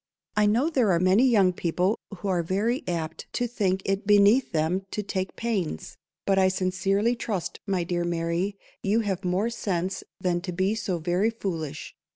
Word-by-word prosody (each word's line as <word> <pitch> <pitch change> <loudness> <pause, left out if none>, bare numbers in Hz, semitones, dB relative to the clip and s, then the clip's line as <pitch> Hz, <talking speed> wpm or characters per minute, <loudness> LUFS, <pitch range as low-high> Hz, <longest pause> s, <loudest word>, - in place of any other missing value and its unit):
_ - - -67 0.3
"I 210 0 +4
know 235 +8 +3
there 245 -9 +3
are 170 - +3
many 190 +8 +4
young 200 -7 +4
people 180 +4 0 0.2
who 200 - -5
are 180 -3 +2
very 205 +9 0
_apt 165 -2 -3
_to 245 - 0
think 190 -5 0
it 195 +1 -1
beneath 205 +5 +5
them 165 +4 0
to 210 - -3
take 190 -1 -3
pains;" 195 - -3 0.3
but 195 -1 +3
I 190 - +5
sincerely 195 +4 +1
trust, 210 -6 -3
my 190 -3 +1
dear 175 0 -1
Mary, 170 +3 -1 0.2
you 210 +3 +2
have 195 -3 -2
more 185 +6 0
sense 185 -4 -2 0.2
than 175 -1 0
to 180 0 -4
be 190 +4 +1
so 205 -5 -2
very 175 +6 +1
_foolish. 165 -9 -4
190 Hz, 185 wpm, -26 LUFS, 175-210 Hz, 0.3 s, beneath